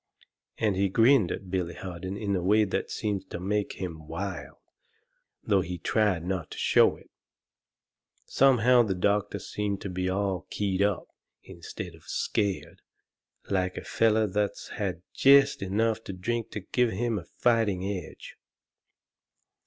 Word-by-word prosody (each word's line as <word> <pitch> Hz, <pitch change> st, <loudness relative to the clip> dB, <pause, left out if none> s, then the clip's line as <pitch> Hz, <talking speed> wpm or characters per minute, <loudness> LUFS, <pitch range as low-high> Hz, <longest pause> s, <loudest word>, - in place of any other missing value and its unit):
And 105 Hz, -3 st, +1 dB
he 95 Hz, +1 st, +1 dB
grinned 115 Hz, -1 st, +4 dB
at 95 Hz, -2 st, -6 dB
Billy 90 Hz, -2 st, -2 dB
Harden 95 Hz, +1 st, -6 dB
in 100 Hz, -2 st, -1 dB
a 90 Hz, -, -1 dB
way 105 Hz, +4 st, +4 dB
that 95 Hz, -, -2 dB
seemed 100 Hz, -3 st, -3 dB
to -, -, -5 dB
make 105 Hz, +3 st, -1 dB
him 80 Hz, -5 st, -7 dB
wild, 95 Hz, +5 st, -5 dB, 0.9 s
though 100 Hz, -3 st, +2 dB
he 90 Hz, 0 st, -5 dB
tried 95 Hz, -4 st, +1 dB
not 90 Hz, -3 st, -3 dB
to -, -, -9 dB
show -, -, +4 dB
it. -, -, -19 dB, 1.1 s
Somehow 125 Hz, -2 st, +5 dB
the 105 Hz, -5 st, 0 dB
doctor 100 Hz, +2 st, 0 dB
seemed 100 Hz, -1 st, -3 dB
to 100 Hz, -, -5 dB
be 90 Hz, 0 st, -2 dB
all 95 Hz, -1 st, -1 dB
keyed 100 Hz, -2 st, -1 dB
up, 100 Hz, -1 st, +1 dB, 0.4 s
instead 90 Hz, +1 st, -8 dB
of 80 Hz, -, -18 dB
scared, 100 Hz, -3 st, -2 dB, 0.7 s
like 95 Hz, -1 st, 0 dB
a -, -, -5 dB
feller 110 Hz, -1 st, +2 dB
that's 105 Hz, 0 st, -2 dB
had 95 Hz, -5 st, -4 dB
jest 140 Hz, -3 st, +5 dB
enough 110 Hz, +3 st, 0 dB
to 95 Hz, -, -5 dB
drink 115 Hz, +5 st, -3 dB
to 105 Hz, -, -4 dB
give 125 Hz, +5 st, +1 dB
him 115 Hz, +1 st, -1 dB
a 85 Hz, -, -12 dB
fighting 110 Hz, -6 st, +2 dB
edge. 95 Hz, -5 st, -6 dB
100 Hz, 150 wpm, -28 LUFS, 90-110 Hz, 1.1 s, Somehow